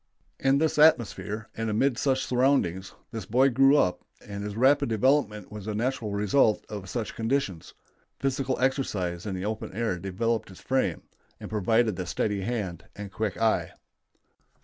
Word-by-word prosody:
In 135 +1 +3
this 155 0 +1
atmosphere, 115 -7 +3
and 115 0 -2
amid 120 +5 +2
such 135 +2 0
surroundings, 125 -8 +1 0.2
this 110 -5 -6
boy 130 +5 +4
grew 135 +4 +5
up, 90 -9 +1 0.3
and 100 0 -5
his 105 0 -5
rapid 130 +2 +3
development 110 -3 +1
was 105 -1 -8
a 105 - -2
natural 115 -1 -1
result 105 +3 +2
of 100 -3 -7
such 115 0 -3
conditions. 115 -7 -2 0.4
Physical 135 -1 -1
exercise 105 -9 -1
in 95 - -3
the 95 +1 -4
open 110 +1 -4
air 110 -4 -1
developed 110 +5 -2
his 95 -2 -13
frame, 130 0 -1 0.4
and - - -9
provided 110 0 +2
the 90 -2 -4
steady 105 +1 -1
hand 95 -5 -3
and 100 -1 -7
quick 105 -2 -3
eye. 115 -1 +1
110 Hz, 160 wpm, -27 LUFS, 100-130 Hz, 0.4 s, grew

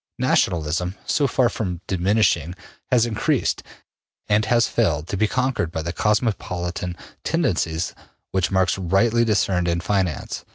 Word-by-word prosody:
Nationalism, 85 +3 +1
so 145 - +2
far 125 -1 +2
from 95 -6 -3
diminishing, 95 -3 +1 0.4
has 120 -2 +4
increased, 110 -3 0 0.7
and 105 +1 +2
has 120 0 +3
failed 80 -9 0
to - - -2
be 110 +3 +2
conquered 130 -9 -1
by 80 - -3
the 85 - -3
cosmopolitan 90 -5 -1 0.3
tendencies 90 - 0 0.4
which 95 -2 +1
Marx 95 -1 +1
rightly 110 +6 +2
discerned 95 -5 +1
in 85 0 +1
finance. 90 -4 -1
95 Hz, 130 wpm, -22 LUFS, 85-110 Hz, 0.7 s, has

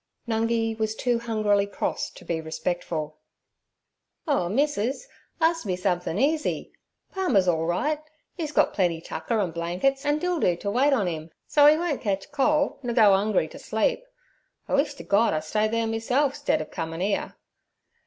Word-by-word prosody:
Nungi 225 0 0
was 220 0 -1
too 240 0 0
hungrily 215 -3 +1
cross - - -2
to - - -15
be 165 -1 -2
respectful. 160 -1 -3 1.1
'Oh, 270 - +1
missus, 275 - 0 0.3
arst 330 0 +2
me 185 - 0
somethin' 180 -1 -1
easy. 300 +6 0 0.4
Palmer's 260 - +2
all 165 -2 +1
right; 295 - 0 0.3
'e's 315 -5 -4
got - - +2
plenty 175 -5 +1
tucker 225 +6 -3
an' 185 -5 0
blankets, 180 +12 -1
an' 295 0 +2
Dildoo 320 - +1
ter 200 - -2
wait 265 +6 +3
on 220 -9 +2
'im, 160 -1 -4 0.2
so 290 -1 +6
'e 305 - +5
won't 330 -4 -2
catch 195 +2 -2
cole, 290 +1 +1
nur 240 -3 -3
go 215 -5 +7
'ungry 195 -4 +2
t' - - -11
sleep. 220 - 0 0.6
I - - -4
wish 285 +1 +2
ter - - -9
Gord 205 -3 +3
I - - +1
stayed 210 +8 0
there 230 0 0
meself 245 +5 +1
stead 155 - 0
ov - - -16
comin' 165 -2 -4
'ere.' 200 +1 -1
220 Hz, 170 wpm, -25 LUFS, 180-280 Hz, 1.1 s, go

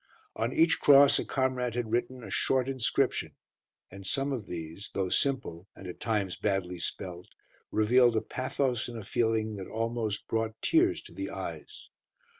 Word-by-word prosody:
On 115 +2 -1
each 165 +2 +3
cross 140 -1 +7
a - - -2
comrade 130 -3 -1
had 120 -3 -2
written 120 +1 -1
a - - -8
short 130 -1 +2
inscription, 130 -4 0 0.6
and 95 +1 -10
some 135 +8 0
of 115 -6 -5
these, 85 +4 -7
though 95 -2 0
simple, 105 -9 -1
and 95 - -12
at 90 - -7
times 105 -5 -1
badly 95 -3 -1
spelt, 90 +1 -4 0.4
revealed 120 +2 +4
a 110 - +2
pathos 130 -1 -1
and 120 -1 -7
a 110 - -6
feeling 110 -1 0
that 95 - -6
almost 115 -2 -2
brought 110 0 -2
tears 350 +2 +2
to - - -13
the - - -4
eyes. - - -7
115 Hz, 165 wpm, -29 LUFS, 100-130 Hz, 0.6 s, cross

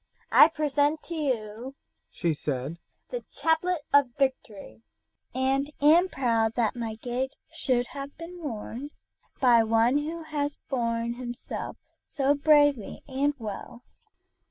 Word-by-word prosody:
"I - - +9
present 300 -1 0
to 340 - -7
you," 255 -4 -3 0.3
she 170 -3 -1
said, 145 +2 -4 0.3
"the - - -4
chaplet 325 +1 +1
of 285 -3 +6
victory, 255 -7 -2 0.5
and 270 +2 0
am 330 +6 +5
proud 230 -5 +1
that 235 -2 +1
my 230 -2 -4
gage 250 +4 -3 0.2
should 245 -2 +1
have 280 0 -7
been 345 +2 -9
worn 250 0 -5 0.5
by 245 -4 +6
one 225 +5 +3
who 325 +3 -4
has 295 -2 -3
borne 235 -2 -1
himself 240 -1 -6 0.3
so 275 0 +1
bravely 290 -5 +3
and 280 +2 0
well. 230 +2 -7
265 Hz, 125 wpm, -27 LUFS, 230-290 Hz, 0.5 s, I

